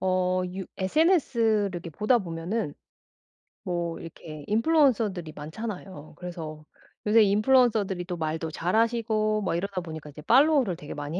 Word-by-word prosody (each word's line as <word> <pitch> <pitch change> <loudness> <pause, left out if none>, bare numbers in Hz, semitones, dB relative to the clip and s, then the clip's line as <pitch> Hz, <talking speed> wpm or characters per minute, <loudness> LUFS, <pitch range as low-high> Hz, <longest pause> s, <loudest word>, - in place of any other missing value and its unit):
어 185 0 +1
유 190 0 -4
SNS를 230 - +2
이렇게 170 -1 -6
보다 210 - +2
보면은 170 -1 -3 0.9
뭐 170 -2 -3
이렇게 155 -2 -9
인플루언서들이 225 - +2
많잖아요. 180 -1 -7
그래서 160 -4 -7 0.4
요새 220 +1 +6
인플루언서들이 210 -3 +3
또 175 -1 -4
말도 160 0 -3
잘하시고 215 +3 +1
뭐 185 -4 -1
이러다 190 +1 -2
보니까 160 -3 -8
이제 150 +1 -11
팔로우를 265 - +4
되게 150 -2 -8
많이 150 +4 -4
185 Hz, 350 characters per minute, -27 LUFS, 165-225 Hz, 0.9 s, 요새